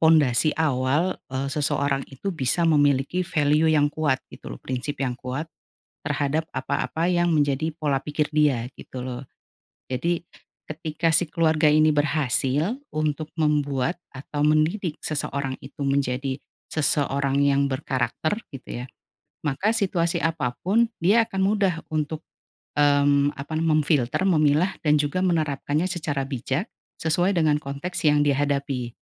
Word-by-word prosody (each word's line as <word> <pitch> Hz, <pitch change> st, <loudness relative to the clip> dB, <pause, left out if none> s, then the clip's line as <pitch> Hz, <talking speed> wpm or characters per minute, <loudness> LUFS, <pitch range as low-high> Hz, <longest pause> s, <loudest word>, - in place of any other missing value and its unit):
pondasi 155 Hz, -3 st, +4 dB
awal, 150 Hz, +3 st, +1 dB
eee, 135 Hz, +1 st, -2 dB
seseorang 140 Hz, -1 st, 0 dB
itu 165 Hz, +9 st, -5 dB
bisa 160 Hz, +2 st, +1 dB
memiliki 145 Hz, +1 st, +3 dB
value 150 Hz, +1 st, +2 dB
yang 145 Hz, -2 st, +3 dB
kuat 145 Hz, -4 st, 0 dB
gitu -, -, -10 dB
loh -, -, -7 dB
prinsip 130 Hz, +3 st, -4 dB
yang 125 Hz, -, -1 dB
kuat, 130 Hz, +5 st, -4 dB, 0.6 s
terhadap 145 Hz, +1 st, 0 dB
apa-apa 165 Hz, +2 st, -1 dB
yang 175 Hz, -1 st, +2 dB
menjadi 150 Hz, +1 st, +1 dB
pola 150 Hz, -3 st, -1 dB
pikir 150 Hz, 0 st, -1 dB
dia 145 Hz, -6 st, +3 dB
gitu 130 Hz, -, -8 dB
loh, 125 Hz, 0 st, -5 dB, 0.7 s
jadi, 170 Hz, +7 st, -1 dB, 0.4 s
ketika 155 Hz, +1 st, -1 dB
si 165 Hz, -1 st, +2 dB
keluarga 160 Hz, -2 st, +3 dB
ini 155 Hz, 0 st, +4 dB
berhasil 145 Hz, -, +1 dB, 0.2 s
untuk 155 Hz, 0 st, -2 dB
membuat 150 Hz, +1 st, 0 dB
atau 145 Hz, +2 st, -5 dB
mendidik 155 Hz, +3 st, +1 dB
seseorang 140 Hz, -3 st, -3 dB
itu 135 Hz, -, -13 dB
menjadi, 135 Hz, 0 st, -1 dB, 0.2 s
seseorang 140 Hz, -2 st, 0 dB
yang 140 Hz, 0 st, +3 dB
berkarakter 135 Hz, +5 st, -1 dB, 0.2 s
gitu 130 Hz, -3 st, -7 dB
ya, 125 Hz, -, -7 dB, 0.6 s
maka 190 Hz, +10 st, +1 dB
situasi 185 Hz, -6 st, 0 dB
apa 160 Hz, -7 st, 0 dB
pun 225 Hz, +5 st, +2 dB
dia 205 Hz, +7 st, +4 dB
akan 195 Hz, -3 st, -5 dB
mudah 195 Hz, -2 st, +2 dB
untuk, 155 Hz, 0 st, -2 dB, 0.5 s
mmm, 145 Hz, -1 st, +4 dB
apa 140 Hz, +3 st, -8 dB
nama 160 Hz, -1 st, +2 dB
memfilter, 150 Hz, +2 st, +1 dB
memilah, 160 Hz, +1 st, +3 dB
dan 150 Hz, -1 st, +3 dB
juga 145 Hz, +5 st, 0 dB
menerapkannya 155 Hz, -2 st, 0 dB
secara 155 Hz, -7 st, -2 dB
bijak, 135 Hz, -, -2 dB, 0.3 s
sesuai 175 Hz, +4 st, +1 dB
dengan 150 Hz, -2 st, +2 dB
konteks 140 Hz, +6 st, -5 dB
yang 150 Hz, 0 st, +3 dB
dihadapi, 140 Hz, -4 st, -1 dB
150 Hz, 135 wpm, -24 LUFS, 140-160 Hz, 0.7 s, pondasi